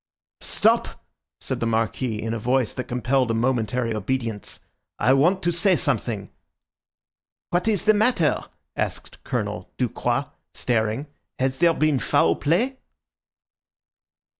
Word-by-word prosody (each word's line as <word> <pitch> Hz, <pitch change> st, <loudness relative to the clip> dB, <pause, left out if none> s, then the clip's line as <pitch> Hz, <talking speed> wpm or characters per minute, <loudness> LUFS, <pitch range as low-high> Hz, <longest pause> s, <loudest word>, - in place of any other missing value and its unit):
"Stop!" -, -, +1 dB, 0.3 s
said -, -, -3 dB
the 115 Hz, -, 0 dB
Marquis 115 Hz, 0 st, -1 dB
in 115 Hz, +1 st, -3 dB
a 115 Hz, -, -2 dB
voice 125 Hz, 0 st, +1 dB
that 130 Hz, -, -4 dB
compelled 125 Hz, +1 st, 0 dB
a 115 Hz, -, +1 dB
momentary 120 Hz, 0 st, 0 dB
obedience. 115 Hz, 0 st, -3 dB, 0.4 s
"I 130 Hz, -, +4 dB
want 175 Hz, +8 st, +3 dB
to 175 Hz, -, +2 dB
say 180 Hz, +3 st, +3 dB
something." 115 Hz, -, -2 dB, 1.2 s
"What 175 Hz, +4 st, +1 dB
is 210 Hz, -6 st, +1 dB
the 215 Hz, -, +6 dB
matter?" 210 Hz, -7 st, +2 dB, 0.3 s
asked -, -, -4 dB
Colonel -, -, -3 dB
Ducroix, -, -, 0 dB, 0.3 s
staring. 115 Hz, +2 st, 0 dB, 0.3 s
"Has 130 Hz, 0 st, 0 dB
there 170 Hz, -1 st, +4 dB
been 155 Hz, -3 st, +2 dB
foul 85 Hz, -7 st, +3 dB
play?" 220 Hz, -, +1 dB
130 Hz, 125 wpm, -24 LUFS, 115-165 Hz, 1.2 s, the